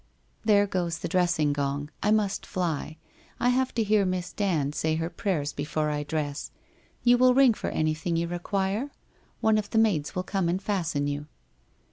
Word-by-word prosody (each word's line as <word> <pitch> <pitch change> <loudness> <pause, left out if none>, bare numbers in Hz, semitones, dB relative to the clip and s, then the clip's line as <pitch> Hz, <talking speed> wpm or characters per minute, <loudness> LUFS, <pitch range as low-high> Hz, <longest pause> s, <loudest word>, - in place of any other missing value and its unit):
There 205 -2 +4
goes 175 -4 -2
the - - -4
dressing 170 -4 +2
gong. 145 +1 -2
I 210 - +1
must 210 -2 +1
fly. 165 -4 -3 0.4
I 245 - +3
have 260 +1 +1
to 230 - +2
hear 210 -1 +3
Miss 185 -1 -2
Dand 165 -9 0
say 155 +1 0
her 165 +2 -2
prayers 150 -8 -1
be 145 - -4
fore 150 0 -1
I 150 0 -1
dress. 145 -1 -3 0.5
You 245 0 +5
will 255 0 +5
ring 265 -3 +6
for - - -4
anything 155 +2 -1
you 170 +1 0
require? 195 +7 -2 0.5
One 220 -1 +4
of 205 - -5
the - - -1
maids 200 -9 +2
will 185 - -1
come 190 -2 -1
and 180 +2 0
fasten 170 -8 -1
you.' 145 +1 -3
175 Hz, 185 wpm, -27 LUFS, 155-205 Hz, 0.5 s, ring